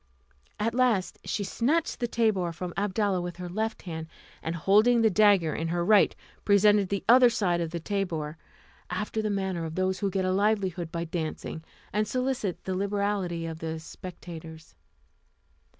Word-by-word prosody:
At 225 +2 0
last, 240 -7 +1
she 205 - -2
snatched 275 - 0
the 240 - 0
tabour 215 -7 +1
from 175 +1 -5
Abdalla 200 -1 0
with 175 -1 -5
her 180 0 -5
left 220 +5 -3
hand, 160 -3 -6 0.3
and 165 +1 -3
holding 215 +8 +4
the 220 - +4
dagger 195 -6 +4
in 165 - -2
her 170 +1 -1
right 210 +1 +5 0.3
presented 205 -1 +4
the 200 -1 -2
other 245 +1 +8
side 180 -7 0
of 165 - -2
the 170 +1 -4
tabour, 165 -5 -2 0.5
after 210 +4 -2
the 215 - -1
manner 190 -4 -1
of 160 0 -5
those 185 0 0
who 200 - 0
get 190 0 -1
a 185 - +1
livelihood 190 -4 0
by 170 0 -2
dancing, 160 -1 -4 0.3
and 210 +1 +1
solicit 255 -7 -2
the 190 - -3
liberality 200 -3 -1
of 160 -1 -5
the 160 0 -4
spectators. 165 -1 -10
190 Hz, 165 wpm, -28 LUFS, 170-210 Hz, 0.5 s, other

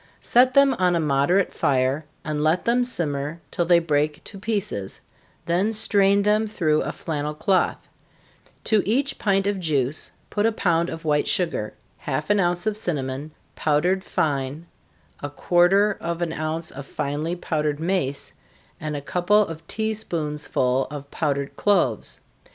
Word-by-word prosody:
Set 255 +1 +3
them 275 -1 +6
on 180 -1 +3
a - - +2
moderate 155 +6 +2
fire, 135 +3 +1 0.2
and 150 -1 -2
let 160 +3 +2
them 245 +1 +3
simmer 155 - -1
till 175 - 0
they 175 0 +5
break 150 -2 0
to 195 - -9
pieces, 200 - -2 0.5
then 180 +6 +1
strain 200 -2 +3
them 210 +1 +2
through 160 -8 +1
a - - -2
flannel 150 -1 -4
cloth 185 +2 0 0.8
to 215 -2 +3
each 270 +6 0
pint 195 -2 +1
of 200 -1 0
juice 150 -4 -1 0.2
put 205 - 0
a - - +2
pound 170 -5 +1
of 165 +1 -7
white 150 -1 +1
sugar, 165 - 0 0.2
half - - -2
an 205 - +3
ounce 175 +1 0
of 215 -1 0
cinnamon, 145 -6 -2 0.3
powdered 175 +6 +1
fine, 145 +1 -2 0.6
a 145 - -4
quarter 180 +7 +3
of 170 0 -2
an 165 -1 -2
ounce 160 +1 -3
of 140 0 -9
finely 150 +5 -2
powdered 150 -4 -2
mace, 160 -5 -1 0.5
and 155 -1 -4
a 145 - -4
couple 180 +8 +2
of 165 -2 -9
tea 220 0 -1
spoonsful 150 -9 -1
of 145 -1 -8
powdered 140 -2 -2
cloves. 175 - +1
165 Hz, 155 wpm, -23 LUFS, 150-200 Hz, 0.8 s, them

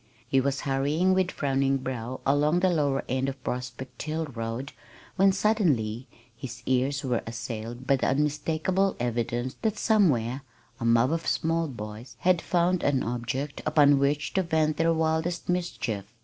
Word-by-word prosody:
He 135 +1 +3
was 140 +1 -1
hurrying 145 +7 +1
with 185 -1 +2
frowning 135 -2 +1
brow 130 -1 -5
along 150 +5 +3
the 185 -1 +3
lower 145 -5 +1
end 130 +1 0
of 135 -1 -9
Prospect 125 +1 -5
Hill 160 +1 -2
road 120 0 -5 0.4
when 195 +1 +5
suddenly 150 - +1 0.3
his 120 0 -8
ears 135 +2 +1
were 125 -3 0
assailed 115 +1 -6
by 140 0 +3
the - - 0
unmistakable 155 +7 +1
evidence 120 +1 -2
that 220 -2 0
somewhere 140 - +2 0.4
a 115 - -3
mob 115 +3 +4
of 165 0 -2
small 165 0 +1
boys 110 -2 -8
had 180 -2 +3
found 175 0 +1
an 135 -2 +1
object 125 +4 -3
upon 145 -2 +5
which 145 +2 0
to 190 - +2
vent 160 -3 +1
their 165 0 +3
wildest 160 +1 0
mischief. 125 - -2
140 Hz, 155 wpm, -27 LUFS, 125-165 Hz, 0.4 s, when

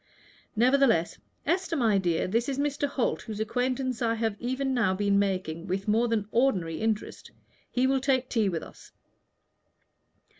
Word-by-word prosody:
Nevertheless 240 -6 +3 0.3
Esther, 345 +2 0
my 225 -8 +3
dear, 175 -3 0
this 230 +7 0
is 270 - -2
Mr. 285 0 0
Holt, 275 -3 -1
whose 215 -2 -7
acquaintance 250 +3 -1
I 230 -1 +1
have 225 -2 -1
now 250 -5 0
been 200 0 +2
making 185 -4 -2
with 195 +2 -3
more 225 +3 +3
than 220 -3 -1
ordinary 185 -11 +1
interest. 220 -1 -2 0.4
He 250 +1 +1
will 265 0 +2
take 260 -1 +1
tea 220 -6 +1
with 170 -3 -3
us." - - -14
230 Hz, 150 wpm, -27 LUFS, 200-260 Hz, 0.4 s, Nevertheless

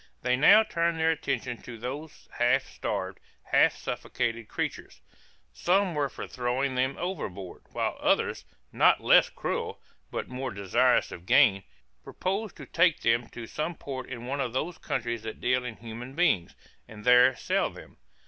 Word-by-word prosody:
They 125 0 +2
now 200 +11 +7
turned 170 -4 0
their 160 0 +3
attention 125 -6 -3
to 120 -2 -9
those 140 +7 -7
half 125 +3 +3
starved, - - -4 0.2
half - - +3
suffocated 115 -2 -3
creatures; - - -5 0.5
some 185 - +2
were 145 -2 0
for 110 - -7
throwing 125 +2 -1
them 130 +2 0
overboard, 100 - -5
while - - -2
others, - - +1 0.3
not - - +4
less - - +6
cruel, - - -4 0.3
but - - -4
more 130 +1 -4
desirous 100 -4 +2
of 85 - -10
gain, 100 0 +5 0.4
proposed 195 +3 -3
to - - -9
take 170 -1 +2
them 115 +1 +1
to 120 - -8
some 155 +8 -3
port 135 -3 -7
in 120 -2 -7
one 140 +2 -2
of 120 -3 -3
those 160 +6 -3
countries 120 -1 -3
that 110 0 -7
deal 125 0 +1
in 125 -3 -5
human 120 +4 -9
beings, 155 - +1 0.3
and 105 -1 -12
there 125 +1 +6
sell - - 0
them. - - -14
125 Hz, 160 wpm, -28 LUFS, 115-155 Hz, 0.5 s, now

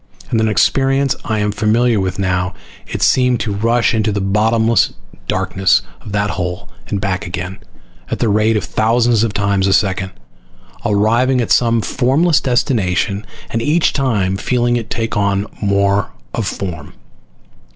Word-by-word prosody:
And 115 - +2
an 110 - +2
experience 135 +6 +2
I 110 - -1
am 105 0 0
familiar 110 +2 +2
with 95 0 -2
now 90 -1 -1 0.4
I - - -2
seemed 125 -1 +2
to 105 - -2
rush 115 +3 +1
into 110 -1 +1
the 100 - -1
bottomless 110 +3 +2 0.3
darkness 95 -1 +1 0.2
of 110 - -9
that 100 0 0
hole 90 -1 -4 0.2
and 100 - -2
back 100 0 -2
again, 90 +2 -5 0.5
at - - -2
the 115 - 0
rate 110 +1 +2
of 105 - -2
thousands 115 +3 +2
of 115 - 0
times 100 -1 0
a 95 - +3
second, 95 -1 +1 0.7
arriving 115 +5 +2
at 120 - -1
some 115 -1 +3
formless 140 +9 +2
destination 105 - 0 0.2
and 115 - -1
each 155 +6 +2
time 105 -9 0
feeling 120 +2 0
it 115 -2 -3
take 115 0 -3
on 100 -1 +1 0.2
more 100 -1 +1 0.2
of 110 -4 -2
form. 90 -4 -5
105 Hz, 155 wpm, -17 LUFS, 100-120 Hz, 0.7 s, a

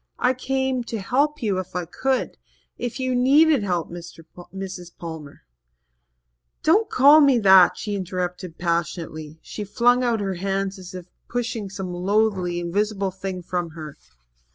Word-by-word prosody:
I 250 +1 +2
came 265 0 -1
to 230 - -4
help 285 +8 0
you 200 -4 0
if 185 0 -7
I 180 -1 -2
could 260 +10 -1 0.4
if 245 +1 -5
you 260 -1 -1
needed 280 +3 +4
help, 180 -5 -2
Mrs. 175 +1 -9
Palmer 160 -4 -9 0.6
" - - -51
"Don't 410 +8 +3
call 285 +4 +7
me 275 -3 +5
that," 190 -4 +6
she 210 - -4
interrupted 180 -2 -4
passionately. 165 -2 -3
She 210 - -6
flung 245 +5 +2
out 235 -2 +1
her 195 -2 -2
hands 195 0 -2
as 185 0 -10
if 180 -2 -7 0.2
pushing 235 -4 -3
some 190 -2 -6
loathly, 185 -1 0
invisible 195 +3 -1
thing 190 -1 -6
from 175 -1 -3
her. 155 -2 -8
195 Hz, 150 wpm, -23 LUFS, 175-245 Hz, 0.6 s, call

